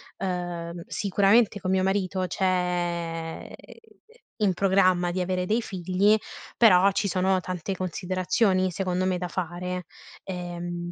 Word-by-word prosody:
ehm, 175 -2 -4
sicuramente 205 +1 +2
con 185 0 -2
mio 190 0 +2
marito 190 -1 0
c'è, 175 -3 -2
uhm, - - -10 0.8
in 200 -3 +2
programma, 185 -2 +3
di 180 +2 -2
avere 180 0 -1
dei 225 +4 +1
figli, 190 +2 +2 0.4
però, 200 -4 +6
ci 200 - -1
sono 190 0 +1
tante 185 +1 -4
considerazioni, 185 +2 0
secondo 185 0 -1
me, 185 -1 +1
da 180 0 -3
fare. 180 0 -4 0.4
Ehm, 175 -1 -5
185 Hz, 125 wpm, -26 LUFS, 175-190 Hz, 0.8 s, però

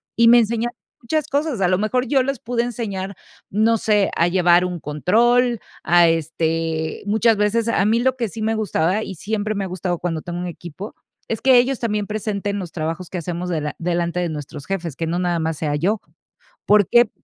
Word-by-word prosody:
y 235 0 +5
me 240 - +8
enseñaron 235 +1 -1 0.3
muchas 310 +5 -1
cosas. 285 -7 -1
A 180 - +4
lo 185 +1 +2
mejor 250 +4 0
yo 270 0 +3
les 275 0 -2
pude 235 +1 -1
enseñar, 200 -5 -4 0.3
no 220 +3 +2
sé, 210 -2 +2
a 170 - +3
llevar 175 0 +4
un 180 -2 -4
control, 235 - +2 0.2
a 175 0 +5
este, 160 0 -1
muchas 220 +1 +3
veces, 215 +2 +1
a 195 - +2
mí 225 +2 +3
lo 260 +1 +1
que 235 - -1
sí 220 - -7
me 220 +1 0
gustaba, 205 -1 0
y - - -6
siempre 215 +4 -2
me 200 - -2
ha 190 - -3
gustado 180 -1 -3
cuando 165 -3 -2
tengo 175 0 -5
un 180 - -3
equipo, 175 - -8 0.3
es 225 - -3
que 260 -2 +6
ellos 260 +1 0
también 210 -3 -1
presenten 205 -1 -3
los 175 -3 -6
trabajos 165 +2 -4
que 185 - -3
hacemos 175 +2 -4
dela 150 -3 -2
delante 170 0 -1
de 175 -2 -1
nuestros 150 -1 -7
jefes, 175 -7 -3
que 165 - -3
no 170 +2 -1
nada 175 -1 0
más 160 -1 -2
sea 150 -2 -1
yo, 195 +8 0 0.6
por 205 -2 +5
qué 240 -2 +5
195 Hz, 210 wpm, -21 LUFS, 170-225 Hz, 0.6 s, me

